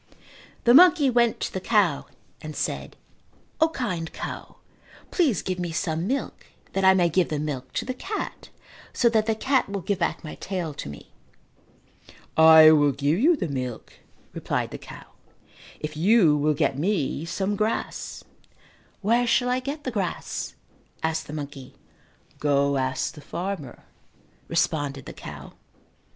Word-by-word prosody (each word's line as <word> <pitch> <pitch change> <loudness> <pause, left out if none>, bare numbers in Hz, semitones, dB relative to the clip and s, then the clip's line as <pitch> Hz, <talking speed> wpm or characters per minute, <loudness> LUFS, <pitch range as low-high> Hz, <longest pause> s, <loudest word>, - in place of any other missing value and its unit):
The 240 - +5
monkey 295 -3 +7
went 235 -1 +2
to - - -3
the 190 - -3
cow 195 -9 +2 0.3
and 155 -1 -7
said, - - -3 0.6
"O, 320 0 +4
kind 180 - -3
cow, - - -7 0.6
please 285 - +1
give 185 -1 -3
me 175 -2 -3
some 165 +1 -2
milk 270 +4 -3 0.3
that 195 - 0
I 190 0 +7
may 175 -2 +4
give 170 +1 +1
the 155 - -2
milk 135 -4 -4
to 225 - -2
the 255 - -3
cat 390 +11 -6 0.4
so 240 - +3
that 220 -1 +1
the 220 - +2
cat 260 +1 +1
will 200 -1 -3
give 190 +2 -2
back 170 - -1
my 155 - -7
tail 180 -5 -4
to 105 - -7
me." 70 - -11 1.2
"I 160 0 +9
will 145 -2 +4
give 145 +6 0
you 325 +8 +5
the 285 - -3
milk," 130 -5 -5 0.4
replied - - -2
the - - -7
cow, - - -11 0.7
"if 150 0 -5
you 175 -1 +4
will 150 +1 +1
get 135 0 0
me 160 -5 0
some 195 +4 -2
grass." 215 +2 -3 0.8
"Where 235 +4 +2
shall 245 +1 +2
I 250 +1 +1
get 280 +4 -5
the 255 - -3
grass?" 195 -6 -3 0.5
asked 160 0 -1
the - - -8
monkey. 140 -3 -7 0.6
"Go 140 -1 +2
ask 130 0 -1
the 150 - -12
farmer," 165 -4 -5 0.6
responded 145 -5 -1
the - - -8
cow. - - -10
175 Hz, 155 wpm, -25 LUFS, 150-225 Hz, 1.2 s, I